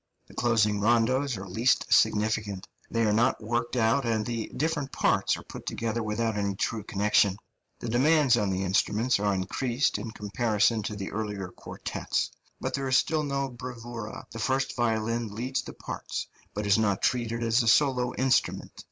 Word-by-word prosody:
The - - -17
closing 110 -4 +2
rondos 120 +4 +2
are 95 0 -7
least 115 +8 +2
significant; 105 -2 +2 0.2
they 115 0 +1
are 105 -1 +3
not 115 +4 +2
worked 120 +3 -2
out, 120 +4 +3
and 110 -3 0
the 115 -1 -3
different 150 -2 -1
parts - - +2
are - - -10
put - - -10
together 115 0 -2
without 110 +1 -1
any 100 -1 -1
true 110 +3 -1
connection. 100 -1 +2 0.4
The - - -6
demands 135 +2 +4
on 105 -4 +1
the 95 0 -1
instruments 105 +5 +1
are 100 0 +1
increased 120 +6 0
in 110 +2 -5
comparison 110 +1 +1
to 105 +1 -4
the 100 -2 -5
earlier 105 -3 -4
quartets, - - -3 0.3
but - - -3
there 135 -1 -1
is 130 - +4
still 160 -1 +1
no 140 -2 -1
bravura; 120 -2 -7
the 115 - -7
first 130 +3 0
violin 115 -2 -1
leads 125 +4 -2
the - - -9
parts, - - -5 0.3
but 105 +1 -2
is 100 +1 +4
not 100 -3 +1
treated 120 -2 0
as 115 +2 +3
a 115 - -2
solo 125 0 +3
instrument. 130 -1 +1
115 Hz, 175 wpm, -28 LUFS, 105-125 Hz, 0.4 s, demands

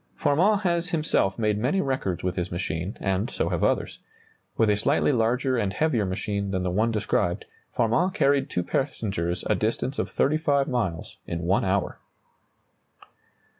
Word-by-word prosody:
] - - -37
Farman 180 - +3
has 175 -2 0
himself 155 - +1
made 105 -2 +1
many 130 - +1
records 130 - -1
with 90 0 -1
his 90 -1 -3
machine, 85 +3 -3
and 95 +3 -1
so - - -1
have - - -1
others. - - 0 0.6
With 110 -2 +4
a - - +3
slightly 140 +8 +2
larger 125 +2 +1
and 105 -4 0
heavier 120 -5 +1
machine 100 +1 -2
than 95 -1 -1
the 90 - -1
one 110 +5 +2
described, 105 -5 0 0.3
Farman 120 +10 +2
carried 140 -8 +2
two 90 - -1
passengers 95 - -2
a - - +3
distance 115 +6 -1
of - - -1
35 145 -1 +1
miles 105 -11 -2
in 85 0 -3
one 95 +4 +2
hour. 95 0 -1
110 Hz, 165 wpm, -25 LUFS, 95-140 Hz, 0.6 s, With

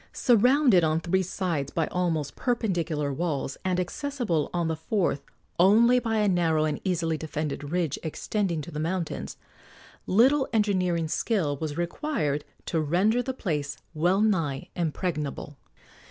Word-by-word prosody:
Surrounded 245 - +4
on 160 0 +2
three 185 +3 +1
sides 175 -6 -2
by 165 - 0
almost 165 -5 -1
perpendicular 170 - -1
walls, 145 -3 -2
and 185 -1 0
accessible 210 - -2
on 170 -2 -1
the 160 - -1
fourth 160 -3 -1 0.4
only 230 +7 +6
by 225 -2 -1
a 210 -1 +2
narrow 165 -4 +2
and 150 -1 -2
easily 165 -4 0
defended 150 -2 -4
ridge 170 -3 -1
extending 170 +1 -2
to 170 - -9
the 150 - -5
mountains, 170 +1 -3 0.7
little 265 +8 +4
engineering 180 -6 +1
skill 160 -4 0
was 150 0 -4
required 170 - -1 0.2
to 165 - 0
render 190 +10 +2
the 260 - -3
place 150 - -3 0.2
well 175 +5 +2
nigh 165 -11 0
impregnable. 155 -3 -3
175 Hz, 140 wpm, -27 LUFS, 155-205 Hz, 0.7 s, only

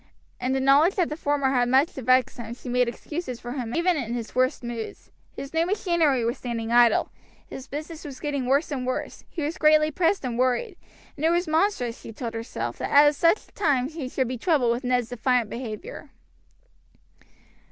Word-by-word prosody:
In 255 +1 -1
the 265 - +1
knowledge 280 +7 +4
that 360 -4 +1
the 300 - -3
former 285 -3 0
had 245 -2 +2
much 270 +5 +3
to 265 - -7
vex 255 +2 +2
him 235 -1 -6
she 250 - -9
made 250 0 +2
excuses 255 +1 -6
for 240 - -7
him 245 -3 -4
even 345 0 +2
in 240 -4 -3
his 230 -2 -5
worst 255 +1 +1
moods. 235 -2 -7 0.2
His 275 +2 -7
new 325 0 +2
machinery 340 - +1
was 235 +4 -2
standing 230 -2 -4
idle, 240 0 +4 0.4
his 265 +1 -9
business 310 +3 -7
was 280 -4 -8
getting 285 -4 -2
worse 280 +4 +2
and 255 -3 -3
worse, 255 - -4
he 325 - -5
was 315 +5 -3
greatly 305 0 +5
pressed 340 +1 +1
and 240 -1 -3
worried, 255 - +1 0.4
and 295 - -8
it 320 - +4
was 345 +1 +1
monstrous, 315 - 0
she - - -9
told 230 0 -6
herself, 225 - -5
that - - -3
at 290 +1 +6
such 335 +7 +2
a - - -25
time 275 -8 +1
he 305 -5 -6
should 260 -1 -1
be 250 0 -4
troubled 290 -9 +2
with 240 +3 -2
Ned's 245 -2 0
defiant 245 -1 0
behavior. 240 - -7
265 Hz, 205 wpm, -25 LUFS, 245-310 Hz, 0.4 s, at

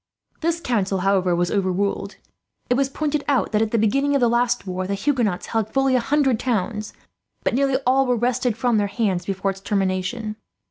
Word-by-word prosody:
"This 335 +1 0
council, 200 - 0
however, 190 -2 +2
was 175 0 0
overruled. 195 +1 -1 0.6
It - - +7
was 270 +1 +1
pointed 300 +1 -2
out 280 -3 +1
that, 210 - +2
at 225 - +1
the 230 - 0
beginning 275 +7 +2
of - - +3
the 240 - +4
last 240 0 +1
war, 185 0 -3
the 200 - -1
Huguenots 225 -5 0
held 225 -2 -1
fully 270 +1 +2
a - - +4
hundred 270 -1 +1
towns, 215 -3 -2 0.5
but - - 0
nearly 270 +1 +2
all 265 +1 +3
were 250 - +2
wrested 245 -1 0
from 235 -2 +2
their 205 - +1
hands 195 -5 -1
before 195 0 -1
its 195 0 -11
termination. 195 +3 -2
225 Hz, 195 wpm, -22 LUFS, 195-260 Hz, 0.6 s, It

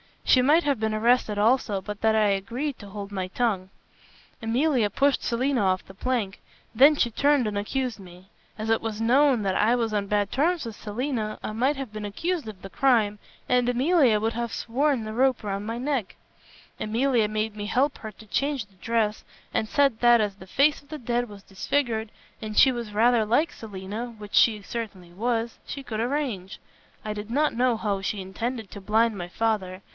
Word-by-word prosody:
She 255 - +5
might 300 +6 +4
have 280 -5 0
been 220 0 0
arrested 225 -1 +2
also, 215 -2 +2
but 205 +1 -7
that 220 0 +3
I 215 -1 +4
agreed 235 +9 -2
to 205 - -10
hold 200 0 -7
my 190 -2 -3
tongue. 190 -3 -1 0.7
Emilia 240 0 +1
pushed 275 +6 +1
Selina 255 +2 0
off 185 -1 +1
the 190 - -13
plank. 215 -2 -2 0.3
Then 280 +6 +7
she 240 -4 +1
turned 280 0 +2
and 205 -1 -2
accused 245 +2 -2
me. 180 0 -14 0.3
As 215 0 -4
it 225 - +2
was 225 -1 -4
known 255 0 +4
that 190 -1 0
I 225 +4 +3
was 230 -3 -1
on 200 -1 -1
bad 205 0 0
terms 325 +3 +1
with 225 -2 -7
Selina, 220 0 -3
I - - -3
might 255 +7 +1
have 270 -5 -6
been 215 -1 -6
accused 325 - -2
of 210 -3 -9
the 195 - -8
crime, 220 -5 +2 0.3
and 250 -1 +3
Emilia 250 -3 +3
would 225 +1 +1
have 235 0 -3
sworn 265 +1 0
the 215 0 -5
rope 255 0 +2
round 200 0 -3
my 230 +1 -3
neck. 255 -5 -2 0.6
Emilia 230 +1 +1
made 215 0 -2
me 205 - -4
help 270 +6 +1
her 220 - -8
to 220 - -15
change 275 +2 -1
the 195 - -27
dress, 220 +1 -1 0.3
and 220 - 0
said 275 -2 +2
that 240 -1 +6
as 205 -2 -1
the 190 -1 -13
face 285 +8 +2
of 285 - -26
the 310 - -5
dead 240 -2 -1
was 205 -2 -12
disfigured, 220 +2 -1 0.3
and 215 -1 -6
she 265 - +7
was 235 -4 -5
rather 230 +1 +4
like 290 +9 +2
Selina 215 +3 -7
which 210 -1 -11
she 215 -3 +4
certainly 200 -5 -6
was, 230 +4 -2
she 275 - -6
could 220 -4 -5
arrange. 235 -7 -2 0.5
I 215 - -3
did 210 +1 -7
not 295 +5 +1
know 245 0 +2
how 205 -3 -2
she 195 +1 -2
intended 220 +4 -4
to 200 - -9
blind 220 +3 +2
my 175 -1 -5
father. 190 -2 -1
225 Hz, 200 wpm, -26 LUFS, 205-255 Hz, 0.7 s, Then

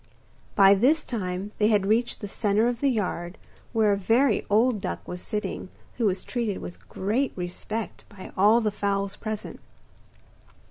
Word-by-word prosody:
By 195 -1 +7
this 270 +10 +3
time 190 -3 -3
they 210 - +4
had 210 -3 +3
reached 225 +4 +1
the 205 - -4
centre 210 +2 +1
of 240 -1 -1
the 280 - +3
yard, 180 -6 -2 0.3
where 220 -3 +3
a - - 0
very 225 +5 +2
old 220 +1 +3
duck - - -5
was 180 0 -5
sitting, 210 -3 -4 0.3
who 230 -3 +2
was 190 -1 -1
treated 230 -6 -2
with 175 - -10
great 230 +8 0
respect 190 +5 -5
by 195 -2 -11
all 210 +5 +5
the 215 -2 0
fowls 200 -1 -1
present. 215 -2 -5
210 Hz, 160 wpm, -26 LUFS, 195-230 Hz, 0.3 s, By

